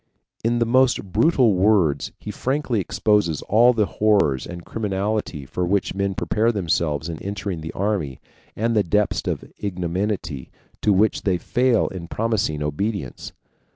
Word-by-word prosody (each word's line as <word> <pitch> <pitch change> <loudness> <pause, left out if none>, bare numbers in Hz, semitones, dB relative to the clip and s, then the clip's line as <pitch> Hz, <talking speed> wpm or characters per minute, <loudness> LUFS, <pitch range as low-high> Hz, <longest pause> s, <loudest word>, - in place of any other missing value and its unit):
In 120 +1 +1
the 120 - +2
most 120 -5 +2
brutal 130 - +4
words 90 -7 +2
he - - -7
frankly 130 -4 -1
exposes 95 -2 +1
all 120 +4 +5
the 110 -4 +1
horrors 100 -12 +1
and 85 -1 -8
criminality 100 -7 -2
for 90 - -3
which 95 +3 0
men 100 0 -1
prepare 110 +5 +1
themselves 80 -7 -1
in 80 -2 -6
entering 95 -3 -4
the 80 +1 -5
army, 95 - -2 0.4
and 115 +2 0
the 105 - +4
depths 105 +3 0
of - - -2
ignominy 90 -5 -3 0.3
to 105 - +3
which 105 +3 +3
they 95 -4 +1
fall 125 +5 +2
in 90 -3 -7
promising 105 -9 -1
obedience. 75 - -3
100 Hz, 150 wpm, -22 LUFS, 85-110 Hz, 0.4 s, all